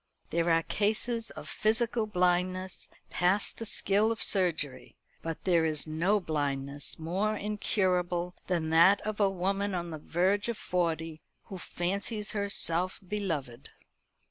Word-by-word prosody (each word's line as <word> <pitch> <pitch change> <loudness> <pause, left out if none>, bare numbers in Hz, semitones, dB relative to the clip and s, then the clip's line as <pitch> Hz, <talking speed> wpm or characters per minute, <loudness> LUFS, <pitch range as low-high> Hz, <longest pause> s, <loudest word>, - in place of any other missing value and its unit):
There 170 +1 +1
are 165 0 +3
cases 220 +2 0
of - - -9
physical 225 +1 +1
blindness 180 -1 0 0.2
past 185 +3 +1
the 225 - -5
skill 205 +3 +2
of 225 - +1
surgery, 160 -9 +1 0.3
but 165 -1 -5
there 170 -3 +3
is 155 -2 +1
no 170 +7 +1
blindness 145 -4 -2
more 190 +7 -1
incurable 180 -4 0
than 165 -3 -1
that 170 +5 +6
of 215 0 -4
a 200 -2 +4
woman 195 +1 -1
on 170 -1 -3
the 155 - -6
verge 190 +8 +1
of 235 - -2
forty 165 -3 -2 0.2
who 190 - -8
fancies 200 +5 -3
herself 185 -3 +1
beloved. 150 - -4
180 Hz, 135 wpm, -30 LUFS, 165-205 Hz, 0.3 s, that